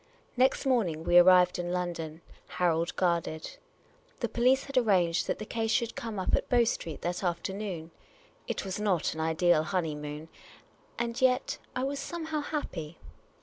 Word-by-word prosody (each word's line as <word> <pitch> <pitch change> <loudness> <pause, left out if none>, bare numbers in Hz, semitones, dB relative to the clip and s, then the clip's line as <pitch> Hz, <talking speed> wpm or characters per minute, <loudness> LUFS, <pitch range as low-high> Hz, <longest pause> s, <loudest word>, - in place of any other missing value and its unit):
Next 260 +3 +2
morning 195 -12 +1
we 175 +1 +6
arrived 180 0 +6
in 175 0 -2
London, 170 -3 -3 0.4
Harold 170 -1 +1
guarded. 170 -3 -1 0.6
The - - 0
police 255 +3 +3
had 275 - -9
arranged 185 -9 +3
that - - -1
the 215 - -6
case 225 0 -2
should 235 0 0
come 225 -3 -5
up 185 - -2
at - - -3
Bow 240 -1 +5
Street 170 -8 -3
that 175 +2 -2
afternoon. 180 -1 -3 0.6
It - - -3
was 190 +1 -4
not 195 -6 +1
an 160 - -8
ideal 160 +1 +3
honeymoon, 155 -3 -3 0.7
and 235 +2 -2
yet, 255 0 +2 0.2
I 255 - -1
was 275 +1 -2
somehow 315 -1 -3
happy. 170 - -5
180 Hz, 155 wpm, -29 LUFS, 165-235 Hz, 0.7 s, we